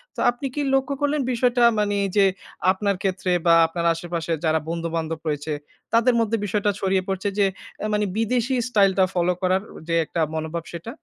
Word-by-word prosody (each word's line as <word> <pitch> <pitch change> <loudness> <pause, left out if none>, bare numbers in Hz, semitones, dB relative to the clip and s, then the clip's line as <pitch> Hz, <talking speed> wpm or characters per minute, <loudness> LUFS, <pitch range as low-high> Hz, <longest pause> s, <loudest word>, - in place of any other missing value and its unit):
তো - - -8
আপনি 245 +3 -4
কি 295 - -1
লক্ষ্য 270 +1 +1
করলেন 290 0 +1
বিষয়টা 245 0 +2 0.2
মানে 205 -1 +1 0.2
যে, 200 - +6 0.5
আপনার 200 +1 0
ক্ষেত্রে 185 -1 -1
বা 170 - +6
আপনার 170 +1 -3
আশেপাশের 165 -1 -3
যারা 160 0 +3
বন্ধু-বান্ধব 165 -1 -3
রয়েছে, 150 0 -2 0.4
তাদের 235 +2 +4
মধ্যে 230 0 +1
বিষয়টা 205 +1 +1
ছড়িয়ে 190 -1 +1
পড়ছে? 195 +1 -2
যে 200 - +5 0.4
এ - - 0
মানে 210 0 +1
বিদেশী 245 +3 +1
স্টাইলটা 195 -4 +4
ফলো 180 0 +2
করার 185 +1 +2 0.3
যে 165 - 0
একটা 165 - -2
মনোভাব 160 +1 -3
সেটা? 170 +7 -6
190 Hz, 175 wpm, -23 LUFS, 170-225 Hz, 0.5 s, যে